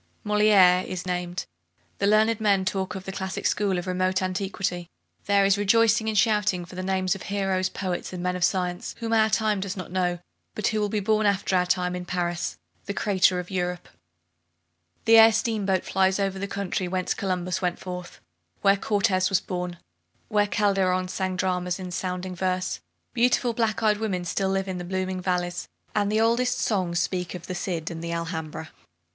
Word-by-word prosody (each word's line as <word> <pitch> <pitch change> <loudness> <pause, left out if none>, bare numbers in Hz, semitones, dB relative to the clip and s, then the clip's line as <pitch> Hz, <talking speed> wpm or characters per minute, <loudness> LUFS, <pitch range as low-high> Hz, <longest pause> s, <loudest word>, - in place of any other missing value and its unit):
Moliere 205 -4 +5
is 185 -1 -5
named, 180 0 -3 0.5
the 200 - +2
learned 215 +1 +3
men 200 -3 +3
talk 190 +1 -2
of 190 - -6
the 195 - -4
classic 190 0 -4
school 200 -3 +1
of 175 - -3
remote 185 0 0
antiquity. 185 -2 -2 0.4
There 200 -1 +4
is 195 +1 +3
rejoicing 220 +1 +3
and 215 - -1
shouting 210 -4 +2
for 175 - -14
the 185 - -4
names 185 0 0
of 195 - -7
heroes, 195 -2 -1
poets, 185 -3 -4
and 180 -1 -5
men 180 0 0
of 180 - -2
science, 180 -1 -1
whom 230 -1 -2
our 220 -1 +4
time 215 -2 +1
does 195 0 -4
not 185 - -7
know, 180 -1 0 0.4
but 215 - -3
who 215 - -1
will 210 -1 0
be 210 0 -1
born 215 +1 +2
after 195 -1 +1
our 180 0 +2
time 180 0 0
in 180 0 -5
Paris, 175 -1 -2 0.3
the 200 - -4
centre 190 -3 +3
of 180 +1 -7
Europe, 180 -1 -2
and - - -20
elsewhere. 85 0 -45
The 225 0 +7
air 225 0 +9
steamboat 210 -4 0
flies 190 0 +2
over 195 -1 -1
the 200 - -3
country 195 -2 -2
whence 185 0 -1
Columbus 185 -2 -2
went 180 -1 0
forth, 180 -1 -7 0.4
where 200 0 +4
Cortez 195 -3 +1
was 195 -2 +3
born, 180 -1 -4
and 170 - -18 0.5
where 205 -1 +2
Calderon 190 -2 +1
sang 185 0 -2
dramas 180 -1 -1
in 180 -1 -6
sounding 180 0 -3
verse. 185 - -1 0.3
Beautiful 245 0 +2
black 225 -1 0
eyed 210 -1 +3
women 200 -5 -1
live - - -6
still 195 +2 0
in 190 -1 -2
the - - -5
blooming 185 +1 -2
valleys, 180 -1 -2 0.3
and 205 -1 +1
the 215 - +2
oldest 245 +2 +2
songs 185 -5 0
speak 180 -1 -2
of 175 -1 -8
the 185 - -5
Cid 175 -2 -3
and 165 0 -6
the 170 - -3
Alhambra. 160 -1 -4
185 Hz, 195 wpm, -25 LUFS, 180-205 Hz, 0.5 s, air